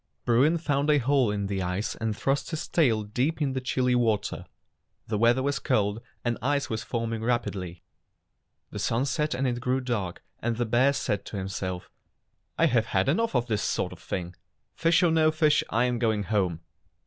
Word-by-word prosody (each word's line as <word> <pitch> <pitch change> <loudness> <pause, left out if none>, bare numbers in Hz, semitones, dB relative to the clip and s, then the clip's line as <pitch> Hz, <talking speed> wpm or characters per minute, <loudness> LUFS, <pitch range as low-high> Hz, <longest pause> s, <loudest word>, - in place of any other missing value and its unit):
Bruin 135 +8 +4
found 145 -2 0
a 150 - +5
hole 135 -2 +2
in 100 -1 -1
the 95 -1 -2
ice 90 +4 -2
and 110 -2 -3
thrust 135 +3 0
his 160 -2 -4
tail 115 -10 +2
deep 125 +10 -1
in 140 -4 0
the 130 - -2
chilly 130 -1 +1
water. 110 -4 0 0.6
The 105 -2 -2
weather 120 +3 +4
was 140 +1 0
cold, 105 -3 0 0.2
and 120 -1 0
ice 140 +2 0
was 110 - -2
forming 115 -2 -3
rapidly. 100 -7 -2 0.9
The - - -5
sun 120 +4 0
set 150 -1 0
and 135 +2 -1
it 120 -2 0
grew 130 +2 0
dark, 115 -9 -3 0.2
and 115 -1 -1
the 120 - 0
bear 125 +5 +3
said 105 - -1
to 105 - -6
himself: 95 -1 -4 0.7
"I 165 - +4
have 120 -7 +2
had 95 +3 +1
enough 225 +4 +1
of 120 -1 +2
this 110 -4 -1
sort - - -1
of - - -13
thing. 90 -1 -4 0.4
Fish 165 +1 +3
or 170 - +4
no 160 -1 +4
fish, 155 -1 +3
I 115 +2 +2
am 125 -1 0
going 110 -3 +1
home." 95 -5 0
120 Hz, 195 wpm, -27 LUFS, 105-140 Hz, 0.9 s, a